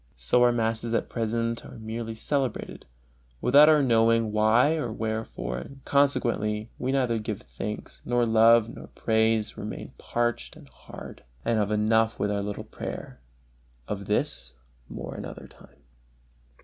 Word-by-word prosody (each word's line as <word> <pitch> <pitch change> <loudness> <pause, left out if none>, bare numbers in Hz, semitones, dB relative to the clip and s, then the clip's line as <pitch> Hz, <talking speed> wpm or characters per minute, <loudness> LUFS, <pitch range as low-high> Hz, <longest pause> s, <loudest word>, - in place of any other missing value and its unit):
So 65 - +2
our 125 0 +6
masses 115 0 -1
at - - -1
present 115 0 -1
are - - -11
merely 115 0 -5
celebrated, 135 +3 -2 0.5
without 145 - +7
our 150 -2 +5
knowing 115 -2 +3
why 110 +7 +4
or 150 -8 -2
wherefore, 110 - -3
and 135 - -11
consequently 115 -6 +1
we 130 - -1
neither 125 -4 +1
give 105 -1 -5
thanks 105 0 -7
nor 120 -1 +1
love 115 0 +5
nor 115 - -10
praise, 110 -1 0
remain - - -6
parched 120 0 -2
and - - -15
hard, - - -11 0.2
and 115 -1 +2
have 105 -1 +1
enough 110 +1 +2
with 105 - 0
our 100 0 0
little 100 0 -4
prayer. - - -7 0.7
Of 100 -1 -5
this 105 - -1 0.3
more - - -6
another - - -8
time. 70 - -20
115 Hz, 145 wpm, -27 LUFS, 110-120 Hz, 0.7 s, without